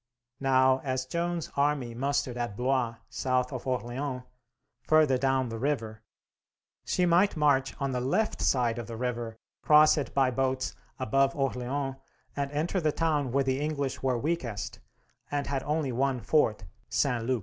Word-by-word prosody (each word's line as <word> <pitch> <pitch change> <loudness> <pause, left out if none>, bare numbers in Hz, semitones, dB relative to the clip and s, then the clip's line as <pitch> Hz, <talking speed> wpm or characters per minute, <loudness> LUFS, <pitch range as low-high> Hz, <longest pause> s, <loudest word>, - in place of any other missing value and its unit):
Now, 130 -1 +4
as 130 -1 -2
Joan's 170 +3 -2
army 140 -4 +1
mustered 135 0 -1
at 120 -4 -3
Blois, 125 -2 0
south 130 0 -1
of 130 +1 -6
Orleans, 125 +1 -2 0.6
further 150 -3 +4
down 135 -1 +1
the 115 0 -5
river, 115 -6 -2 0.8
she 180 - +1
might 175 +2 +3
march 140 -3 +2
on 140 -1 -1
the 125 -1 -1
left 140 - 0
side 120 -3 +2
of 120 - -6
the 115 -1 -6
river, 120 -2 -3 0.2
cross 155 +1 +6
it 140 - -4
by 135 -2 +3
boats 130 0 -1 0.2
above 135 +2 +2
Orleans, 135 0 -2 0.4
and 140 -1 -1
enter 160 +6 -1
the 155 -2 +2
town 150 -5 0
where 135 +2 +2
the 130 0 0
English 145 -3 -2
were 130 -2 +1
weakest 125 -7 -3 0.5
and 145 -1 -1
had 135 -1 -2
only 150 -2 -1
one 130 +1 0
fort, 115 -7 +2 0.3
St. 125 -1 +1
Loup. 125 +1 0
135 Hz, 160 wpm, -29 LUFS, 125-145 Hz, 0.8 s, cross